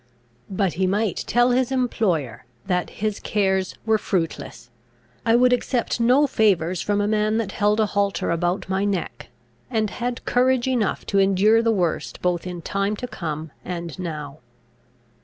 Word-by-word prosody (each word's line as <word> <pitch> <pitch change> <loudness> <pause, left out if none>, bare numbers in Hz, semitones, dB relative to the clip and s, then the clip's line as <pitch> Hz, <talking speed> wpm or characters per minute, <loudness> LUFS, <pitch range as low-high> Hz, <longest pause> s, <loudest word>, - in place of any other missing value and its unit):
But 190 -2 0
he 185 - +3
might 205 +1 0
tell 240 +1 +3
his 255 +1 +1
employer, 185 - 0 0.2
that 180 -1 0
his 215 0 -3
cares 190 -2 0
were 220 -1 +3
fruitless: 165 - -3 0.6
I 225 - +5
would 250 +1 +5
accept 245 -1 -1
no 250 +5 +4
favours 185 - +1
from 205 0 0
a 205 - 0
man 215 0 +1
that 220 -4 -2
held 210 +2 +1
a 215 - +4
halter 200 -2 0
about 175 +3 -1
my 190 +1 0
neck; 200 -4 -3 0.4
and 215 -3 0
had 245 0 -4
courage 255 0 +2
enough 245 -6 0
to 200 - +1
endure 195 +4 +4
the 230 0 +2
worst 180 -6 -1
both 180 0 -1
in 175 -2 -6
time 200 +3 -1
to 250 - -5
come 155 - -5
and 170 -1 -6
now. 155 -4 -6
200 Hz, 160 wpm, -23 LUFS, 180-225 Hz, 0.6 s, I